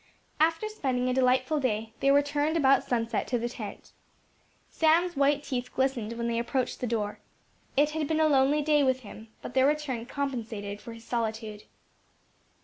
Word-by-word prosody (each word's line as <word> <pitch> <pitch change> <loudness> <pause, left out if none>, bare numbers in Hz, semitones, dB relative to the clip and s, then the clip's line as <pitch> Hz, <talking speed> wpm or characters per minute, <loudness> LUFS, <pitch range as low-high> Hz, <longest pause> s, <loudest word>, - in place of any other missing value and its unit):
After 325 +6 +2
spending 260 -12 -1
a - - +1
delightful 260 +3 +2
day, 220 -4 -1
they 275 - +2
returned 290 +3 +2
about 275 -3 +4
sunset 230 -2 -1
to 245 - 0
the 235 +1 -2
tent. 215 -4 -8 0.8
Sam's 335 +2 +3
white 285 +1 +2
teeth 250 -3 -4
glistened 260 -4 0
when 235 0 -3
they 230 0 0
approached 250 +2 -2
the 250 - -2
door. 210 -3 -2 0.6
It 295 +2 +4
had 310 -1 -2
been 315 +1 0
a 315 - +4
lonely 285 +1 +3
day 300 0 +3
with 260 -1 +1
him, 220 0 -11 0.2
but - - -7
their 265 +1 +4
return 280 -6 -1
compensated 225 -8 -4
for 235 - -9
his 230 0 -12
solitude. 220 -2 -3
260 Hz, 170 wpm, -28 LUFS, 230-290 Hz, 0.8 s, about